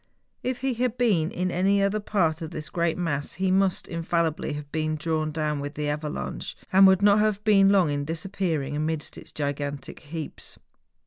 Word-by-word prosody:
If 250 -1 -3
he 265 -1 0
had 245 0 -1
been 200 -10 +2
in 180 0 -2
any 195 +3 +2
other 200 +2 +1
part 175 -6 0
of 160 - -4
this 155 -2 -6
great 170 -1 0
mass 145 -5 -2
he 190 0 0
must 190 -1 +2
infallibly 165 -2 -1
have 145 -1 -7
been 155 -1 -1
drawn 155 0 -1
down 150 -1 -1
with 145 +1 -5
the 150 0 -2
avalanche, 150 +1 -4 0.2
and 195 +1 +8
would 190 +1 +4
not 205 0 +6
have 210 -1 +1
been 195 -2 +5
long 190 -6 +4
in 145 0 -1
disappearing 160 -3 -2
amidst 155 0 -2
its - - -11
gigantic 145 -1 -4
heaps. 155 0 -7
165 Hz, 185 wpm, -26 LUFS, 150-195 Hz, 0.2 s, and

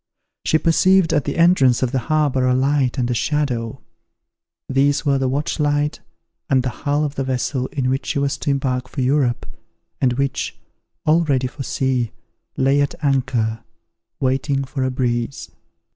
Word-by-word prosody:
She 160 - +3
perceived 175 +3 +3
at 150 -3 +1
the 145 - -3
entrance 155 -8 +4
of 125 - 0
the 135 - 0
harbour 145 -4 +2
a 125 - +3
light 135 0 +1
and 125 -2 0
a - - +2
shadow; 125 -4 -1 0.9
these 140 +2 +1
were 140 -1 +2
the 130 -1 0
watchlight 145 +1 0 0.5
and 130 -2 +3
the 130 - -1
hull 145 +5 -1
of 145 - -3
the 135 - -2
vessel 130 0 -1
in 135 -3 -2
which 135 +2 -1
she 155 - -1
was 140 0 0
to - - -2
embark 130 -2 -1
for - - -4
Europe, 130 -2 +1 0.6
and 125 -2 +3
which, 140 +2 -2 0.5
all 160 +2 +4
ready 135 -4 +1
for 130 +2 -6
sea, 130 -3 0 0.5
lay 135 +2 +3
at 140 - -1
anchor, 120 -5 0 0.6
waiting 135 +1 0
for 135 0 -3
a 130 - +1
breeze. 120 0 -2
135 Hz, 165 wpm, -20 LUFS, 130-145 Hz, 0.9 s, entrance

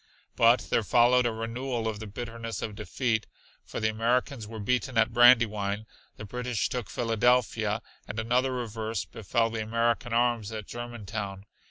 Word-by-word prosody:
But 115 +2 +5
there - - +3
followed 120 +3 +4
a - - 0
renewal 115 +1 -3
of 110 -2 -3
the 110 - -6
bitterness 115 +1 -5
of 110 - -4
defeat, 110 +1 -1 0.4
for - - -6
the 110 -1 +1
Americans 115 +1 0
were 110 +1 -8
beaten 125 +3 -1
at 115 +1 +3
Brandywine, 110 -4 +4 0.3
the 105 - -7
British 125 +2 -2
took 120 -7 -4
Philadelphia, 115 -1 +1 0.2
and 105 - -6
another 125 +4 +1
reverse 115 -3 -3
befell 115 +1 -1
the 110 -1 -3
American 115 +2 0
arms 115 -2 +1
at 110 -2 -5
Germantown. 105 -5 -6
115 Hz, 155 wpm, -28 LUFS, 110-120 Hz, 0.4 s, But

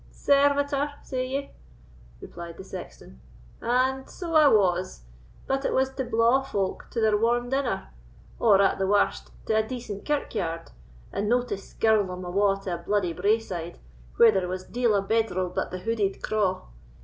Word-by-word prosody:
"Servitor, 285 0 +2
say 255 -1 -3
ye?" 275 +2 -4 0.7
replied 170 -1 -9
the - - -8
sexton, 60 - -10 0.4
"and 260 +3 0
so 345 -3 -6
I 310 -2 +7
was; 185 - +2 0.4
but 270 +1 -1
it - - 0
was 265 0 +2
to 265 0 -3
blaw 235 +2 +3
folk 200 -8 -3
to 235 - -3
their 220 -1 +3
warm 240 +3 +1
dinner, 265 - -1 0.5
or 205 -4 +5
at 195 - +2
the 190 - +1
warst 205 +1 +1 0.2
to - - 0
a 220 - +4
decent 220 -3 -6
kirkyard, 180 - -2 0.4
and 210 +1 -1
no 245 +1 +3
to 235 -5 -3
skirl 215 +2 +1
them 180 0 -6
awa' 195 +2 +1
to 185 - -3
a - - -2
bluidy 180 0 0
braeside, 190 -5 -1 0.4
where 230 -1 +7
there 190 -3 0
was 185 +1 -4
deil 235 -1 +1
a 200 - +1
bedral 195 -4 0
but - - -2
the 185 - -5
hooded 205 0 -2
craw. 205 -4 0
220 Hz, 170 wpm, -26 LUFS, 190-255 Hz, 0.7 s, I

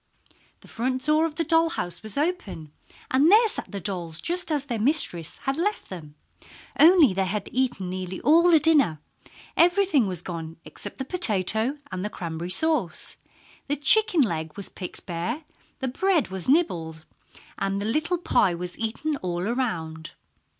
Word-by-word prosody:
The - - -17
front 255 +2 -2
door 305 +2 +3
of 305 - -10
the 330 - 0
doll 330 0 +3
house 175 - -4
was 215 +1 -2
open, 285 - -3 0.4
and 275 +5 +4
there 445 +4 +6
sat - - -5
the 200 - -4
dolls 170 -4 -1
just 350 -1 -2
as 290 -2 0
their 240 -5 -3
little 215 - 0
mistress 175 - 0
had 270 +1 -1
left 410 +6 -2
them 155 -5 -9 0.6
only 315 - +7
they 190 0 0
had 200 +1 -3
eaten 245 -8 -1
nearly 185 0 -5
all 335 +4 +5
the 325 -2 +6
dinner! 290 - +3 0.6
Everything 350 - +3
was 180 -3 -5
gone 165 -2 -6
except - - -6
the 265 - -4
potato 225 - 0
and 185 0 -4
the 210 - -2
cranberry 170 -2 -6
sauce. 240 - 0 0.5
The 290 - 0
chicken 360 +5 +5
leg 160 - -2
was 200 - -2
picked 180 - -8
bare, 175 - -4 0.4
the 265 - -1
bread 340 +5 +1
was 190 +4 -4
nibbled, 165 - 0 0.5
and 195 0 -1
the 200 - -3
little 310 +10 0
pie 195 - +2
was 180 +1 -6
eaten 255 +7 -2
all 180 -3 -3
around. 165 -10 -3
230 Hz, 170 wpm, -25 LUFS, -, 0.6 s, only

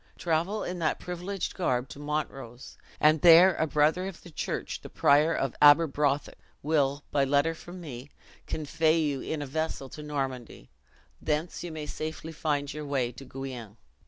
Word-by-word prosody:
Travel 175 +5 0
in 180 0 -4
that 160 -2 0
privileged 180 +2 -4
garb 130 -8 0
to - - -10
Montrose; 135 -5 -5 0.2
and 155 0 +4
there 175 +2 +8
a 160 - +1
brother 155 +5 +2
of 190 -3 -9
the 175 - -12
church, - - -4
the - - -10
prior 150 +3 +4
of 135 -3 -1
Aberbrothick, 145 -1 +4 0.2
will, 145 -2 +1
by 140 - +2
a - - +3
letter 145 +4 +2
from 175 +2 -11
me, 140 -5 -8 0.4
convey 160 +1 +1
you 145 -4 -1
in 155 -2 -3
a - - -5
vessel 140 -1 -3
to 150 - -9
Normandy; 135 - -5 0.5
thence 155 +3 -2
you 175 - -5
may 155 -1 -5
safely 155 +1 -5
find 145 -2 -2
your 150 0 -6
way 130 -4 0
to 125 - -11
Guienne." 125 -5 -8
150 Hz, 170 wpm, -28 LUFS, 140-165 Hz, 0.5 s, there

